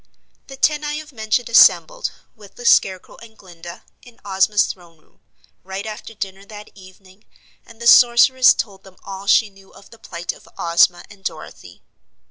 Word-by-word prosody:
The 270 - -12
ten 300 +2 0
I 295 0 -4
have 310 0 -9
mentioned 220 +1 -2
assembled, - - +4 0.3
with 205 -3 -17
the 245 - -11
Scarecrow 190 -5 +1
and 220 -1 -16
Glinda, 175 -2 -13 0.2
in 245 -1 -19
Ozma's 200 +2 +1
throne 170 -3 -11
room, 155 - -33 0.4
right 190 +2 -7
after 220 +1 -9
dinner 195 -2 -7
that 210 +1 -13
evening, 190 +1 -19 0.4
and 230 -1 -17
the 235 - -8
Sorceress 245 +2 +5
told 195 -4 -6
them 190 -1 -18
all 195 0 -9
she 215 0 +3
knew 195 0 -21
of 195 - -19
the 230 - -17
plight 175 -4 -6
of - - -19
Ozma 170 +1 +2
and 195 -1 -18
Dorothy. - - -9
205 Hz, 170 wpm, -19 LUFS, 190-235 Hz, 0.4 s, Sorceress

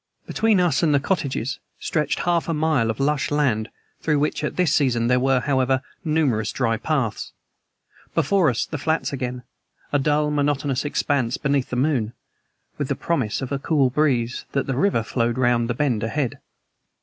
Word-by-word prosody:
Between 220 -3 +2
us 170 -6 +2
and 155 -4 +3
the - - +4
cottages 140 -5 -2 0.2
stretched 155 -2 -1
half 170 -1 0
a 165 - +1
mile 150 -7 +1
of 110 - -3
lush 140 +1 +1
land 130 -7 +1 0.3
through 150 -2 +1
which 150 +1 -1
at 150 - -2
this 175 -4 +2
season 125 -5 +2
there 125 +1 +3
were, 130 0 +2
however, 130 -1 +1 0.2
numerous 145 - +1
dry 115 -3 0
paths. 130 -4 -2 0.8
Before 190 -6 +3
us 120 - -1
the 155 - -5
flats 160 +1 -1
again, 125 -2 -4 0.5
a 145 - +4
dull, 150 +1 +1
monotonous 145 -2 0
expanse 140 -4 0
beneath 140 -2 0
the - - -3
moon, 125 -4 0 0.7
with 145 - -1
the - - -1
promise 135 -8 -1
of 130 - -4
the 140 - -2
cool 140 -3 +2
breeze 125 -5 0
that 140 - 0
the 135 - -2
river 140 - +2
flowed 115 +1 -1
round 120 -2 +2
the 120 - 0
bend 125 -5 0
ahead. 125 +2 -2
140 Hz, 175 wpm, -23 LUFS, 125-150 Hz, 0.8 s, the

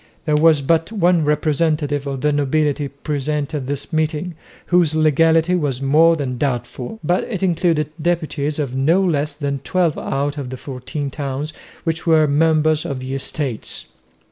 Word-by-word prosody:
There 150 -2 +2
was 155 -1 +4
but 165 +6 +1
one 180 -5 +2
representative 150 -1 0
of 135 -2 -4
the 150 - +2
nobility 145 0 +1
present 145 +1 -3
at 140 -4 -3
this 145 +4 -4
meeting, 155 +2 -1 0.3
whose 175 -3 +2
legality 160 +2 +3
was 145 -8 0
more 155 +5 +4
than 130 -5 -3
doubtful, 125 - -3
but 175 +1 +1
it 195 -5 -4
included 165 -4 +1
deputies 155 -3 -1
of 140 -4 -2
no 155 +8 +3
less 150 -3 0
than 140 -2 -2
twelve 170 +2 0
out 145 +2 -2
of 135 -3 -5
the 130 - -6
fourteen 135 +2 -5
towns 140 +2 -4 0.3
which 165 0 -2
were 160 -1 +5
members 155 +1 +2
of 135 -2 -4
the 130 +1 -5
Estates. 135 -3 -3
150 Hz, 160 wpm, -20 LUFS, 140-160 Hz, 0.3 s, were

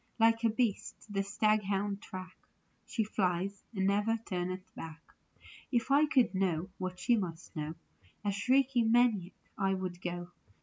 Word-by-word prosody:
Like 225 0 +4
a 230 - +5
beast 225 -2 0 0.2
the 195 - +2
staghounds 200 -1 +1
track 185 0 -8 0.5
She 225 - 0
flies, 195 -1 -1
and 190 -1 +1
never 210 +3 +2
turneth 185 0 -3
back. 165 0 -9 0.6
If 240 +1 +1
I 295 +2 +6
could 260 -7 +3
know 185 -2 0
what 185 -1 -3
she 240 - +3
must 175 -5 -4
know 155 +1 -3 0.5
A 205 - +2
shrieking 245 +2 +3
maniac 225 -7 +3 0.3
I 195 -1 +2
would 185 -1 -4
go. 175 0 -4
195 Hz, 145 wpm, -32 LUFS, 185-225 Hz, 0.6 s, I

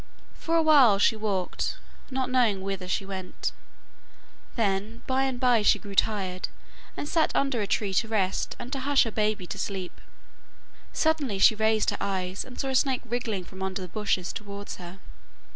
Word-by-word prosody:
For 330 - -2
a 325 - +4
while 275 -10 +7
she 205 - +4
walked, 200 -4 -2 0.3
not 260 -1 -2
knowing 230 -7 +3
whither 195 -2 -4
she 190 +1 -1
went, 190 -2 -4 1.0
then 210 +1 -1
by 265 +1 +1
and 260 -2 -2
bye 245 -3 +4
she 210 - +5
grew 200 -1 -9
tired, 190 -3 +1 0.5
and 290 - -4
sat 320 +1 +2
under 270 -5 +1
a 205 - -1
tree 200 -1 0
to 225 - +2
rest 195 -4 0
and 250 +3 -7
to 270 - -2
hush 280 +1 +4
her 225 - -3
baby 215 -2 0
to - - -6
sleep. 190 -3 -4 0.9
Suddenly 305 -10 +1
she 205 +4 +6
raised 220 0 +2
her - - -4
eyes, 190 -1 -2
and 250 - -11
saw 270 - -1
a - - -1
snake 260 -1 +2
wriggling 230 -5 -2
from 190 +1 -11
under 190 0 -3
the - - -6
bushes 190 -1 -1
towards 200 0 -7
her. 180 +1 -9
215 Hz, 180 wpm, -27 LUFS, 195-255 Hz, 1.0 s, while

